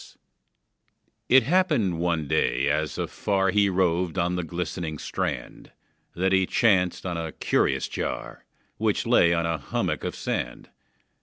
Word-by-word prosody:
It 130 0 +7
happened 120 - +1
one 85 -3 0
day, 65 0 +1
as 75 +1 -1
afar 95 -2 0
He 100 0 +3
roved 90 -1 0
on 90 0 +1
the 90 - -1
glistening 85 -1 -4
strand, - - -5 0.4
That 95 +2 +1
he 95 -1 +3
chanced 95 -7 +2
on 90 -2 -2
a 80 -1 -4
curious - - 0
jar, 60 +1 -5 0.3
Which - - 0
lay 85 - +4
on 85 -1 +1
a 85 -1 -1
hummock 65 - -2
of - - -3
sand. - - -4
90 Hz, 140 wpm, -25 LUFS, 80-95 Hz, 0.4 s, It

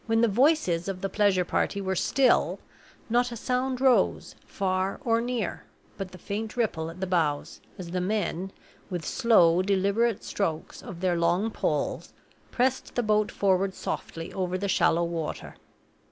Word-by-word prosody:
When 225 0 +2
the 235 - +5
voices 220 - +2
of 190 -2 -4
the 195 - -2
pleasure 200 -4 +2
party 200 - 0
were 190 -1 -2
still, 255 +7 +2 0.5
not 245 +1 +1
a - - -5
sound 255 +2 -1
rose, 260 -2 +2
far 190 0 -1
or 230 -1 +2
near, 235 -5 -3 0.3
but 195 -2 -6
the 185 - -11
faint 215 +5 -5
ripple 165 -9 -1
at 165 +2 -10
the 190 - -1
bows, 160 -6 -1 0.2
as 175 -3 -7
the 180 0 -1
men, 190 -1 -2 0.4
with 175 -4 -4
slow, 180 -7 +4
deliberate 200 +3 +1
strokes 165 -6 -3
of 175 -3 -9
their 180 -2 +1
long 175 +6 +1
poles, - - -2 0.4
pressed 260 +1 -1
the 245 - +1
boat 215 -1 +2
forward 190 -1 +1
softly 165 +1 -5
over 185 -1 -1
the 200 +2 -2
shallow 170 -2 +3
water. 170 -2 -4
195 Hz, 160 wpm, -27 LUFS, 180-225 Hz, 0.5 s, the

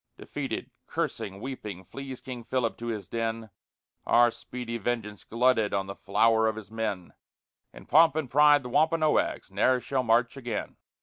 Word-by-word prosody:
Defeated, - - -5 0.2
cursing, 95 0 -3
weeping, 105 -7 -6
flees 135 +6 -8
King 125 -3 -7
Philip 120 -1 -1
to 120 - -5
his 110 -3 -4
den, 115 -1 -3 0.6
Our 120 0 +5
speedy 115 0 -6
vengeance 105 -2 -3
glutted 115 -3 +2
on 95 -1 0
the 100 - -6
flower 110 +3 +2
of 110 - 0
his 110 -1 -9
men; 105 -5 -3 0.6
In - - -13
pomp 160 0 +5
and 155 -4 -1
pride 145 +1 +5
the 125 - -6
Wampanoags 155 +3 +2
ne'er 130 -1 +3
shall 130 +1 -1
march 120 +1 +2
again. 120 -5 -5
115 Hz, 160 wpm, -28 LUFS, 110-130 Hz, 0.6 s, Our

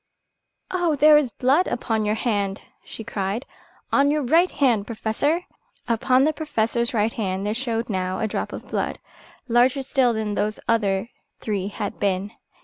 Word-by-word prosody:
"Oh, 350 -4 +1
there 300 +2 +7
is 295 -4 +3
blood 275 +9 +2
upon 220 -2 -1
your 210 +1 +1
hand," 205 -4 -1 0.2
she 225 - -9
cried, 205 +1 -3 0.5
"on 280 0 +4
your 300 0 +1
right 330 +8 +4
hand, 235 -7 +1
Professor!" 265 +10 -1 0.4
Upon 255 +3 +3
the 310 +2 +2
Professor's 235 -6 0
right 220 -1 +1
hand 195 -2 -2
there 210 - 0
showed 235 -1 -2
now 185 -2 -2
a 220 - -1
drop - - -3
of - - -8
blood, - - -2 0.5
larger 250 +3 +3
still 260 -2 +2
then 215 -1 -2
those 210 +1 -1
other 205 -2 +1 0.3
three 200 -3 -2
had 205 0 -5
been. 200 0 0
230 Hz, 160 wpm, -23 LUFS, 210-270 Hz, 0.5 s, there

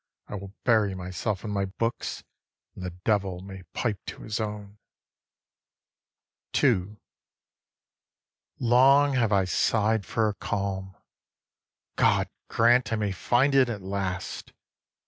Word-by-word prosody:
I - - -9
will 100 0 -7
bury 110 -5 +3
myself 95 +2 -3
in 105 - -4
my 100 -1 0
books, 115 +5 -3 0.5
and - - -9
the 90 - -2
Devil 95 0 -1
may 95 0 -9
pipe 105 -6 -2
to - - -7
his 110 0 -3
own. 105 -1 -5 1.8
II. 95 +4 +2 1.6
Long 135 +4 +5
have 120 -5 +2
I 100 -2 +3
sigh'd 110 +4 +1
for 115 -1 +1
a 105 - -1
calm: 95 -2 -3 1.0
God - - +3 0.2
grant 120 +2 +3
I - - +2
may 105 -2 -1
find 125 +9 +2
it 135 -2 +5
at 105 -5 -5
last! 95 -1 -4
105 Hz, 125 wpm, -27 LUFS, 95-115 Hz, 1.8 s, Long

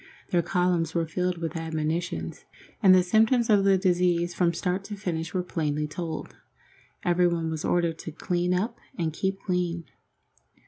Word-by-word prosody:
Their 175 - +3
columns 175 -2 0
were 165 -1 +2
filled 180 +2 -1
with 165 -1 -4
admonitions, 160 +1 -3 0.4
and 190 -4 +8
the 185 - +5
symptoms 225 +5 +3
of 205 -2 +5
the 195 -1 +5
disease 175 -2 +2
from 170 0 +2
start 180 +3 -2
to 205 - -5
finish 170 -5 -3
were 185 -1 -1
plainly 150 -4 -1
told. 165 +1 -5 0.7
Everybody 175 -1 +2
was 160 -1 -3
ordered 170 -2 +1
to 160 - -6
clean 175 +3 -1
up 215 +6 -1 0.2
and 160 -3 -1
keep 190 +4 -1
clean. 175 -2 -1
175 Hz, 155 wpm, -27 LUFS, 165-185 Hz, 0.7 s, and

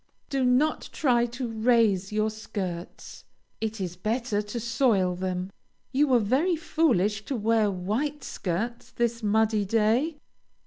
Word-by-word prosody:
Do 270 -2 +1
not 255 +5 +2
try 240 -5 +2
to 240 +1 -4
raise 220 -4 +2
your 215 +1 +1
skirts. 190 -5 -6 0.4
It 220 0 -3
is 180 -2 -4
better 215 +3 -1
to 210 +3 -5
soil 225 -5 +2
them. 185 +1 -3 0.4
(You 285 +3 +3
were 255 -2 +5
very 265 - +2
foolish 230 - +1
to 275 - -3
wear 225 -1 +2
white 220 +11 -2
skirts 220 +7 -3
this 235 0 -1
muddy 215 0 +2
day.) 225 - +1
225 Hz, 135 wpm, -27 LUFS, 205-250 Hz, 0.4 s, were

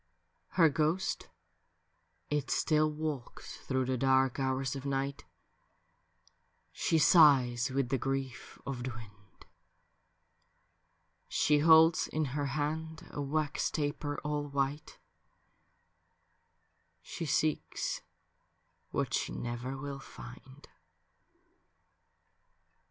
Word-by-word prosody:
Her 165 -3 +7
ghost 160 +5 0 1.0
it 145 -2 -1
still 155 -1 +2
walks 150 -4 -5
through 130 -1 -1
the 130 -1 -1
dark 130 0 +3
hours 130 0 -1
of 135 - -6
nipht, 140 0 -2 1.5
She 165 - +1
signs 135 -7 +5
with 135 -1 -1
the 135 - 0
grief 135 -2 -4
of 135 -2 -4
the 130 - -3
wind; 105 -5 -13 1.8
She 150 -1 +2
holds 160 +1 +6
in 155 0 -1
her 145 -1 -1
hand 155 +3 -3
a 145 - -4
wax 150 +1 -1
taper 145 -1 -2
all 150 -1 -2
white; 140 +1 -2 2.1
She 165 - -5
seeks 155 +2 -1 0.9
what - - -2
she - - -1
never 120 +3 -4
will 140 0 -6
find. 130 +2 -12
140 Hz, 95 wpm, -31 LUFS, 130-150 Hz, 2.1 s, Her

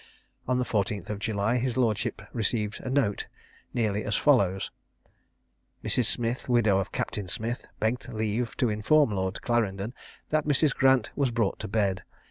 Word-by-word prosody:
On 125 0 +2
the 125 - 0
14th 100 -3 -1
of 105 - -4
July 110 +2 0
his 125 0 -1
lordship 115 -3 0
received 110 -1 -1
a - - -5
note 130 -7 +1 0.4
nearly 110 -3 0
as 105 - 0
follows: 100 -10 +3 1.1
Mrs. 125 - +2
Smith, 120 +3 -1
widow 110 -5 +4
of 95 - -3
Captain 100 -3 -3
Smith, 115 +6 -3
begged 120 +3 -1
leave 110 +1 -2
to 125 - +2
inform 110 +6 +3
Lord 95 -1 -2
Clarendon 110 -2 0 0.4
that 155 -1 +1
Mrs. 145 0 +3
Grant 130 -4 +3
was 140 -2 +2
brought 115 -4 0
to - - -4
bed. 95 -3 0
115 Hz, 155 wpm, -28 LUFS, 100-125 Hz, 1.1 s, widow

